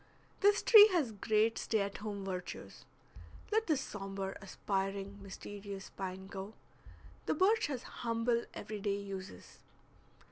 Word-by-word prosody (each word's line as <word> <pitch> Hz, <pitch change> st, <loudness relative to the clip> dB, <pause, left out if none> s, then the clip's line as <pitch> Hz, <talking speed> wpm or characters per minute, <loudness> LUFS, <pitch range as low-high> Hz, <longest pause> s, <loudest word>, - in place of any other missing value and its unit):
This 405 Hz, 0 st, +4 dB
tree 430 Hz, -2 st, +10 dB
has 300 Hz, -10 st, +2 dB
great 215 Hz, +2 st, +1 dB
stay 220 Hz, -2 st, +1 dB
at 200 Hz, 0 st, -3 dB
home 200 Hz, -1 st, -5 dB
virtues. 180 Hz, -2 st, -6 dB, 0.7 s
Let 440 Hz, +1 st, +2 dB
the 310 Hz, -4 st, +3 dB
sombre, 195 Hz, -5 st, -4 dB
aspiring, 195 Hz, +1 st, -3 dB
mysterious 200 Hz, 0 st, -8 dB
pine 190 Hz, 0 st, -5 dB
go; 195 Hz, +2 st, -7 dB, 0.7 s
the -, -, +2 dB
birch 425 Hz, +7 st, +3 dB
has 260 Hz, -4 st, -4 dB
humble 235 Hz, 0 st, -1 dB
every 215 Hz, -1 st, -5 dB
day 200 Hz, 0 st, 0 dB
uses. 195 Hz, -1 st, -8 dB
205 Hz, 130 wpm, -34 LUFS, 195-235 Hz, 0.7 s, tree